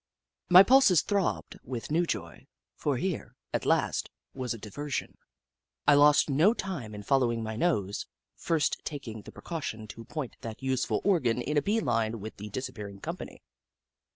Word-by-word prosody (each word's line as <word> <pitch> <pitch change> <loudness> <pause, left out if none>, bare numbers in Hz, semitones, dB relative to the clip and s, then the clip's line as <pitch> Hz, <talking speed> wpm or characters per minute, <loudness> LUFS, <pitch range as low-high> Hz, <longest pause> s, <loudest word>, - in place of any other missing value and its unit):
My 180 +2 +10
pulses 250 - +6
throbbed 200 -3 -1
with 125 +2 -6
new 170 +2 +2
joy, - - -5 0.3
for - - -1
here, - - -3 0.2
at - - -1
last, - - +1 0.2
was 130 -2 -4
a 115 - -2
diversion. 130 +7 -5 0.7
I 145 - +8
lost 145 +1 +6
no 160 - +4
time 150 - -5
in 105 - -7
fol 135 +6 +3
lowing 120 -3 0
my 110 0 -4
nose, 105 - 0 0.3
first 160 -4 0
taking 120 -8 -6
the - - -12
precaution 115 -10 -5
to 115 +2 -9
point 150 -6 -5
that 115 +3 -7
useful 130 -1 0
organ 140 - +2
in 145 +5 -2
a 145 - +4
bee 210 +8 +1
line 115 - 0
with 110 +2 -8
the 105 +1 -7
disappearing 105 -4 -6
company. - - -7
130 Hz, 165 wpm, -29 LUFS, 110-165 Hz, 0.7 s, My